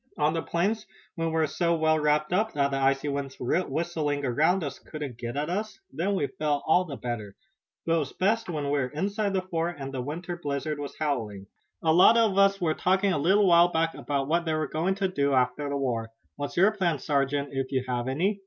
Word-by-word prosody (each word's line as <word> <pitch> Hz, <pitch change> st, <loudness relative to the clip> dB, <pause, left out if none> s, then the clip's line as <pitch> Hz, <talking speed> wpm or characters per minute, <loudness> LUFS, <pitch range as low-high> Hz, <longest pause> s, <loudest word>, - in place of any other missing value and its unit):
"On 150 Hz, +1 st, +2 dB
the 165 Hz, -, -1 dB
plains 205 Hz, +7 st, -1 dB, 0.3 s
when 165 Hz, -1 st, -2 dB
we 160 Hz, -, -2 dB
were 160 Hz, -1 st, +3 dB
so 170 Hz, +3 st, 0 dB
well 155 Hz, -1 st, +2 dB
wrapped 150 Hz, +2 st, +1 dB
up 215 Hz, +4 st, +1 dB
that 140 Hz, -1 st, +1 dB
the 135 Hz, -, 0 dB
icy 135 Hz, +1 st, +1 dB
winds 140 Hz, -1 st, -3 dB
whistling 155 Hz, 0 st, -1 dB
around 160 Hz, +9 st, +2 dB
us 145 Hz, -, -5 dB
couldn't 145 Hz, -6 st, -7 dB
get 120 Hz, +2 st, -5 dB
at 150 Hz, +1 st, -1 dB
us 210 Hz, +5 st, -3 dB
then 195 Hz, +4 st, 0 dB
we 165 Hz, -, +1 dB
felt 150 Hz, -3 st, -2 dB
all 180 Hz, +3 st, +3 dB
the 145 Hz, -5 st, -6 dB
better. 110 Hz, -5 st, -5 dB, 0.5 s
But 165 Hz, -, +1 dB
it 165 Hz, -, +3 dB
was 145 Hz, -3 st, -4 dB
best 220 Hz, +2 st, 0 dB
when 155 Hz, -4 st, -2 dB
we 145 Hz, -, +2 dB
were 130 Hz, -, 0 dB
inside 200 Hz, -, -2 dB
the 190 Hz, -1 st, 0 dB
fort 175 Hz, -1 st, -2 dB
and 135 Hz, -1 st, -6 dB
the 130 Hz, -, -2 dB
winter 170 Hz, +6 st, -5 dB
blizzard 145 Hz, 0 st, -3 dB
was 145 Hz, -1 st, -6 dB
howling." 110 Hz, -10 st, -2 dB, 0.4 s
"A 160 Hz, -1 st, +4 dB
lot 185 Hz, +7 st, +7 dB
of 220 Hz, -4 st, +3 dB
us 195 Hz, 0 st, +4 dB
were 160 Hz, -3 st, +1 dB
talking 190 Hz, +3 st, +2 dB
a 145 Hz, -, 0 dB
little 195 Hz, +7 st, +4 dB
while 170 Hz, -1 st, +6 dB
back 165 Hz, 0 st, +1 dB
about 140 Hz, -2 st, -2 dB
what 170 Hz, +3 st, +1 dB
they 160 Hz, -1 st, 0 dB
were 155 Hz, 0 st, -1 dB
going 175 Hz, +5 st, -1 dB
to 195 Hz, -1 st, 0 dB
do 140 Hz, -6 st, 0 dB
after 130 Hz, +3 st, +1 dB
the 140 Hz, -, -1 dB
war. 120 Hz, -5 st, -2 dB, 0.3 s
What's 145 Hz, -1 st, -5 dB
your 195 Hz, +4 st, +5 dB
plan, 180 Hz, -7 st, 0 dB
sergeant, 140 Hz, 0 st, 0 dB
if 135 Hz, -1 st, -3 dB
you 130 Hz, -2 st, 0 dB
have 125 Hz, -1 st, -2 dB
any?" 185 Hz, +10 st, 0 dB
155 Hz, 230 wpm, -27 LUFS, 140-180 Hz, 0.5 s, lot